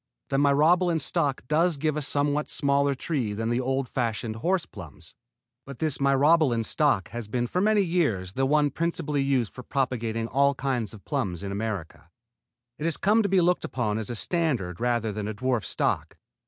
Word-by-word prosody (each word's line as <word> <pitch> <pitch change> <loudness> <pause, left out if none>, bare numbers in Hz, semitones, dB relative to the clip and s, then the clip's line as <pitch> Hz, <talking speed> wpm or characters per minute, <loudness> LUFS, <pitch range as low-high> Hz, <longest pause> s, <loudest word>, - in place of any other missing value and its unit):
The 135 - +1
Myrobalan 160 +5 +3
stock 145 -2 -1
does 160 +2 +2
give 155 +1 0
a 150 - -2
somewhat 145 +1 0
smaller 140 -1 +1
tree 130 -7 -2
than 115 +2 -2
the 120 +2 +1
old 135 +1 -1
fashioned 115 -2 -2
horse 180 +8 0
plums; 80 0 -12 0.5
but 140 -1 -10
this 155 0 +1
Myrobalan 140 -2 +3
stock 125 -3 +1
has 120 -1 -6
been 120 +3 -1
for 180 +9 -1
many 210 0 +3
years 145 - 0
the 135 +3 +1
one 145 0 +3
principally 165 -4 -1
used 135 -5 0
for 125 - -8
propagating 115 -4 -2
all 140 +3 +2
kinds 125 -6 -2
of 100 - -16
plums 100 - -2
in 100 - -4
America. 95 -6 -5 0.7
It 150 - -3
has 165 - +2
come 215 +3 +3
to 200 - 0
be 190 -1 +4
looked 180 +1 +2
upon 110 -4 -2
as 110 - -3
a 120 - -3
standard 120 - -1
rather 120 -2 0
than 105 0 -4
a 110 - -4
dwarf 125 0 -1
stock. - - -1
135 Hz, 185 wpm, -26 LUFS, 115-150 Hz, 0.7 s, be